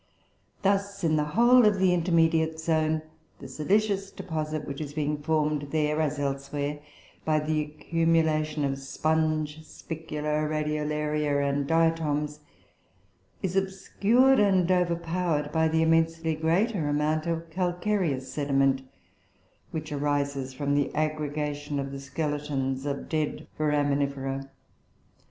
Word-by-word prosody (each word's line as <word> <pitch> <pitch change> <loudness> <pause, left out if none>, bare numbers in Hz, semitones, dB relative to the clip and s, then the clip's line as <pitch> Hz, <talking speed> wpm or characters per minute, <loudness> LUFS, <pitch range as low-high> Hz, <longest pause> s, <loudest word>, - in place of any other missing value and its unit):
Thus, 200 0 0
in 160 -2 +3
the 150 - +2
whole 245 +1 +7
of 210 -2 +4
the 185 -1 +3
"intermediate 165 -2 +2
zone," 160 -1 +1 0.3
the - - -9
silicious 195 +4 0
deposit 155 -4 -4
which 140 +1 -5
is 145 -1 -6
being 150 -1 -1
formed 150 -1 0
there, 150 0 +1
as 150 -2 0
elsewhere, 140 +1 -2 0.4
by 155 -1 +2
the 155 0 0
accumulation 155 -1 +1
of 135 0 -2
sponge 155 +2 -1
spicula, 150 -2 -3
Radiolaria, 150 -1 0
and 140 0 0
Diatoms, 155 -2 +1 1.0
is 185 -1 -1
obscured 200 +7 +3
and 190 -3 +3
overpowered 170 -3 0
by 160 0 +2
the 160 0 +2
immensely 165 0 +2
greater 165 +3 +1
amount 155 +2 0
of 165 0 -3
calcareous 175 -5 -1
sediment, 135 -2 +2 0.9
which 155 -1 -5
arises 140 -2 -1
from 140 +2 -2
the 145 -1 +1
aggregation 150 -1 -2
of 135 -1 -3
the 140 - -6
skeletons 140 -2 -2
of 140 -1 -3
dead 155 -2 -2
Foraminifera. 140 -2 0
155 Hz, 120 wpm, -27 LUFS, 145-165 Hz, 1.0 s, whole